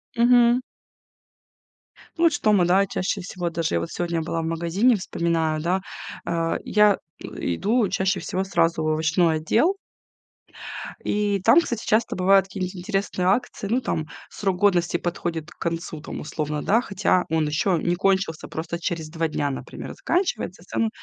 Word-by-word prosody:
Мгм. 240 0 +5 1.5
Ну, 335 - -1
вот 330 - +5
что 215 -6 +2
мы 185 -4 +4 0.2
чаще 195 +2 -2
всего 180 -1 -4
даже 165 - -1
я - - +2
вот 85 - -4
сегодня 170 -1 -2
была 165 +1 -2
в - - -4
магазине, 170 +9 +2
вспоминаю, 165 -4 -1
да, 180 +4 0 0.4
э, 165 -1 0
я, 210 -1 +4 0.3
э, - - -6 0.3
иду 220 - +2
чаще 190 0 0
всего 185 +2 -2
сразу 170 -4 +1
в - - 0
овощной 160 +1 +2
отдел. 235 - +2 1.3
И 205 -1 +1
там, 230 - +7
кстати, 235 -9 -4
часто 220 +2 +1
бывают 195 +1 +4
какие-нибудь 185 0 -4
интересные 190 -1 -2
акции. 210 0 0
Ну, 245 +4 +1
там 155 -10 -2 0.2
срок 195 -3 -2
годности 175 -3 +2
подходит 170 -1 -4
к - - -17
концу, 165 -2 -3
там, - - -7
условно, 150 0 -3
да, 225 +4 +3
хотя 190 -3 +1
он 160 -1 +1
еще 160 +4 +1
не 175 0 +1
кончился, 190 -3 0
просто 170 +2 -5
через 165 -2 -3
2 165 0 -1
дня, 145 -2 -1
например, 135 - -7
заканчивается, 335 - -1
в - - -19
целом 225 +3 0
180 Hz, 165 wpm, -24 LUFS, 165-205 Hz, 1.5 s, там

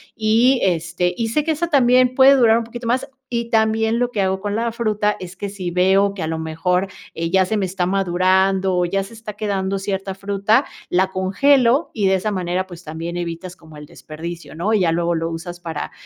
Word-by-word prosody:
y, 230 +4 +3
este, 175 0 0
y 230 +2 -2
sé 285 +7 0
que 320 - 0
esa 330 +2 -1
también 255 -4 +4
puede 270 +1 +7
durar 230 -4 +5
un 235 - -1
poquito 235 +1 -8
más, 250 +2 0 0.2
y 235 -1 -2
también, 220 0 +2
lo 245 0 0
que 205 - -1
hago 190 0 0
con 205 +1 -3
la 230 +1 -1
fruta 215 -2 0
es 185 0 -8
que 200 +2 -5
si 190 -3 -5
veo 190 +3 +3
que 190 - -6
a - - -2
lo 160 0 -2
mejor, 180 +4 -1 0.3
eh, 165 0 -2
ya 190 +1 +3
se 215 +4 -2
me 200 - 0
está 180 0 -2
madurando, 190 0 +2
o 180 - +2
ya 195 +3 -1
se 195 - -12
está 225 -1 -8
quedando 195 -2 -2
cierta 195 0 -3
fruta, 200 +6 +1 0.2
la 185 +2 +2
congelo 250 - +2
y 205 -4 0
de 190 - +3
esa 200 +3 -1
manera, 185 -1 -2
pues, 175 -1 -11
también 165 +2 -6
evitas 175 +1 -5
como 160 -3 -15
el 150 - -10
desperdicio, 165 +3 -9
¿no?, 195 +7 -1
y 215 - +3
ya 170 - +2
luego 170 +1 0
lo 165 0 -2
usas 175 +1 -7
para, 165 -3 -5
195 Hz, 225 wpm, -20 LUFS, 175-225 Hz, 0.3 s, puede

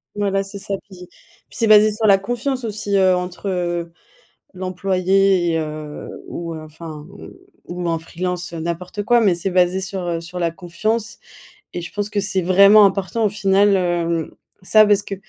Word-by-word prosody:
Voilà, 195 -1 0
c'est 200 +1 -9
ça 200 0 -3
puis 180 -3 -13 0.4
puis - - -12
c'est 230 - +2
basé 215 0 +6
sur 215 +1 -1
la 200 -1 +6
confiance 245 +6 -3
aussi, 210 -2 -3
heu, 185 -1 +4
entre, 180 +2 -4
heu, 175 -2 -2 0.6
l'employé 185 0 +1
et, 165 - 0
heu 155 -1 -6 0.2
ou 170 -1 -6
enfin, 155 -1 -9
mmh, 200 +1 -12 0.4
ou 175 0 -4
en 165 -1 0
freelance 180 +2 -4
n'importe 170 +4 -4
quoi. 240 +3 +3
Mais 200 -6 +3
c'est 175 +3 -3
basé 180 +1 +2
sur, 190 0 -4
heu, 170 -1 -2
sur 170 +2 -8
la 170 -1 0
confiance 215 +6 -3 0.6
et 175 - -4
je 175 - -8
pense 205 0 -3
que 210 - -1
c'est 195 -1 0
vraiment 200 +4 +6
important 195 +3 0
au - - +2
final, 200 0 +3
hem, 170 -2 -1 0.3
ça 215 +3 +5
parce 205 -1 +3
que 200 - -5
190 Hz, 180 wpm, -20 LUFS, 175-205 Hz, 0.6 s, basé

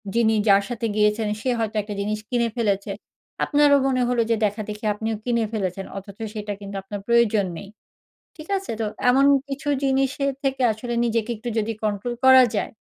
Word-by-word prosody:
যিনি 225 -1 +3
যার 200 0 +5
সাথে 235 -1 -3
গিয়েছেন 210 +1 +2
সে 255 - -1
হয়তো 220 -1 -2
একটা 205 +1 -7
জিনিস 210 +1 -2
কিনে 240 -2 +1
ফেলেছে। 200 -3 0 0.5
আপনারও 290 -1 +4
মনে 255 -1 +1
হলো 245 -1 +2
যে - - +4
দেখা-দেখি 210 +1 -4
আপনিও 220 +2 -3
কিনে 235 -1 +1
ফেলেছেন, 195 -2 -3
অথচ 195 0 -9 0.2
সেটা 210 -1 -4
কিন্তু 200 0 -7
আপনার 205 +1 -6
প্রয়োজন 235 -4 +3
নেই। 200 - -9 0.7
ঠিক 310 -1 -11
আছে? 385 -9 -6
তো 220 - 0 0.2
এমন 265 +2 +5 0.2
কিছু 280 +2 -5 0.2
জিনিসের 270 +1 +1
থেকে 270 -1 -1
আসলে 240 +3 -5
নিজেকে 230 0 0
একটু 225 +3 -7
যদি 220 +1 -1
কন্ট্রোল 210 +3 -2
করা 260 0 +9
যায়, - - -2
225 Hz, 175 wpm, -23 LUFS, 210-250 Hz, 0.7 s, করা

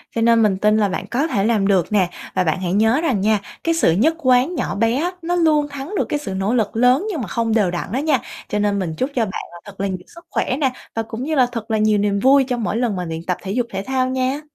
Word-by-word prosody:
cho 230 - 0
nên 230 0 +4
mình 195 -3 +2
tin 210 +2 +3
là 205 -2 +2
bạn 185 - -4
có 280 +6 +1
thể 200 -10 0
làm 215 -4 +2
được 190 -1 +2
nè. 190 -4 +2 0.3
Và 185 - +2
bạn 170 +2 0
hãy 180 0 -1
nhớ 225 +7 +3
rằng 255 - 0
nha, 215 0 +2 0.2
cái 330 - +2
sự 325 - +3
nhất 275 - +2
quán 255 +3 +2
nhỏ - - -2
bé 230 +3 +1
á 340 +6 0
nó 350 +2 -1
luôn 305 -4 +3
thắng 280 +8 -6
được - - +1
cái 295 - -1
sự 200 -9 -5
nỗ 195 +4 -1
lực 225 -3 0
lớn 250 - +3
nhưng 320 -9 -3
mà 205 - -4
không 225 +2 -1
đều 205 -6 +2
đặn 180 +2 -4
đó 245 - -1
nha. 290 -4 +2 0.3
Cho 210 - -1
nên 205 -1 +1
mình 175 -4 -3
chúc 260 - -1
cho 235 -3 +2
bạn 190 - -5
là 175 - -10
thật 200 -2 -13
là 200 - 0
nhiều 190 - -3 0.2
sức 340 0 -14
khỏe 255 - -1
nè, 270 -3 +2 0.2
và 225 - 0
cũng 225 +3 -6
như 310 +2 -1
là 255 -2 +5
thật 230 -2 -5
là 220 - +2
nhiều 215 0 +3
niềm 200 0 +1
vui 270 +4 +5
cho 250 -2 -1
mỗi 225 -1 -2
lần 235 -5 0
mà 180 -1 -3
luyện 165 0 -5
tập 180 0 -2
thể 195 - -4
dục 240 +2 0
thể 195 0 -4
thao 260 +2 0
nha. 260 +3 -1
225 Hz, 300 wpm, -20 LUFS, 200-265 Hz, 0.3 s, là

